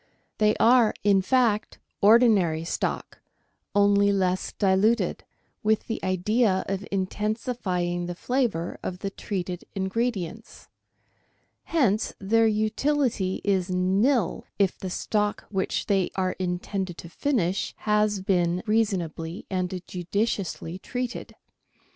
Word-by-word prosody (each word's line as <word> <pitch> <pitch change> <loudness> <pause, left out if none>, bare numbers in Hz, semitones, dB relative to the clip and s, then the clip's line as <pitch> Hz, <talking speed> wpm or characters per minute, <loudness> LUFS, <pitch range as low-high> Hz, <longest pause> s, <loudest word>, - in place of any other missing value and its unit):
They 215 0 +4
are, 235 -2 +4
in 200 -1 +4
fact, 225 0 +1 0.2
ordinary 200 -7 +5
stock, 165 - -3 0.5
only 200 0 +4
less 185 -2 0
diluted, 205 +4 +2 0.4
with 220 -2 +1
the 225 - -4
idea 190 +2 +1
of 195 +1 -3
intensifying 190 -3 -2
the 175 - -4
flavour 230 -7 -1
of 180 - -4
the 195 - -2
treated 180 -4 -4
ingredients 195 -2 -3 1.0
r - - -16
hence 230 -10 +2
their 225 +3 +3
utility 220 -1 0
is 190 -2 +1
nil 190 +5 +1
if 195 -2 +2
the 190 - -6
stock 210 +3 -1
which 190 -2 -1
they 195 -3 +1
are 185 -1 0
intended 180 0 -3
to - - -9
finish 195 - -1
has 210 -2 +1
been 180 -2 +1
reasonably 185 -6 -1
and 185 -1 -2
judiciously 185 -1 -3
treated. 250 +3 -5
195 Hz, 110 wpm, -26 LUFS, 185-220 Hz, 1.0 s, ordinary